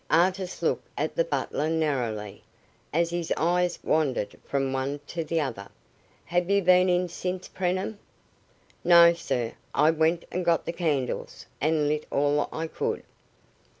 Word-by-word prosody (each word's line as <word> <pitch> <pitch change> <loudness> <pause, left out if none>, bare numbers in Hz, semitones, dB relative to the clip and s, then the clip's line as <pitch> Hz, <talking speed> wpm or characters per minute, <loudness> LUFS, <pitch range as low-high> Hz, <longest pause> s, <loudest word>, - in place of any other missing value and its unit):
Artis 185 +2 +1
looked - - 0
at - - -2
the - - +3
butler 155 - -2
narrowly, 125 -11 -2 0.5
as 170 +2 +1
his 175 -1 -3
eyes 175 +2 +1
wandered 140 -9 0
from 135 -1 -1
one 135 +2 -2
to 165 +2 -4
the 165 +1 -1
other. 115 -9 -4 0.6
"Have 175 +1 0
you 200 0 +3
been 180 +1 +5
in 180 0 +2
since, 180 +1 -4
Preenham?" 185 +3 -2 0.8
"No, 170 -1 +8
sir. 120 -8 -2 0.2
I 155 - +5
went 160 +1 +1
and 180 - -2
got 170 -2 +2
the 170 - -3
candles, 145 -8 -2 0.2
and 155 0 +2
lit 150 +1 -1
all 145 +1 +1
I 160 - -3
could." 160 - -3
165 Hz, 150 wpm, -27 LUFS, 145-180 Hz, 0.8 s, No